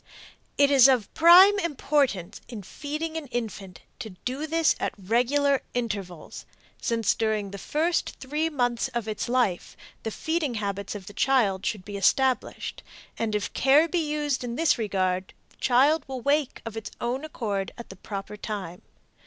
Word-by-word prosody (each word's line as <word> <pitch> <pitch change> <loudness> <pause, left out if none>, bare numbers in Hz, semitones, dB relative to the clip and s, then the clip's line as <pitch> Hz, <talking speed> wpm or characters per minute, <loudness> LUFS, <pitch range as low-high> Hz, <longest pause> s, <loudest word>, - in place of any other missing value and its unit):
It 285 0 +4
is 270 -2 +8
of 250 -6 +1
prime 370 +5 +8
importance 275 - 0
in 225 -5 -8
feeding 305 - -5
an 310 -3 -6
infant 215 -7 -5 0.2
to 230 -3 -6 0.2
do 270 +5 -3
this 325 0 +2
at - - -2
regular 255 +8 +1
intervals, 200 -8 -5 0.3
since 230 -2 +1
during 215 -3 -1
the 200 - -7
first 330 - -1
three 300 +4 -1
months 245 -5 0
of 235 -2 -2
its 215 +2 -3
life 240 -8 0 0.2
the 225 - -3
feeding 315 +1 -2
habits 200 -1 -3
of 200 -2 -8
the 205 - -10
child 210 -7 +2
should 200 -4 -3
be 205 -1 -6
established, 260 +5 +1 0.4
and 220 -2 -1
if 210 - -2
care 285 +5 +4
be 350 +1 0
used 295 -4 -1
in 240 -1 -4
this 325 +2 +3
regard 185 -3 -1
the - - -27
child 275 +6 +3
will 260 -2 -5
wake 285 +1 0
of 225 -1 -6
its 220 -1 -5
own 250 +4 -2
accord 210 -10 -3
at 235 - -10
the 190 - -9
proper 200 +2 -7
time. 200 -5 -6
240 Hz, 165 wpm, -26 LUFS, 205-290 Hz, 0.4 s, is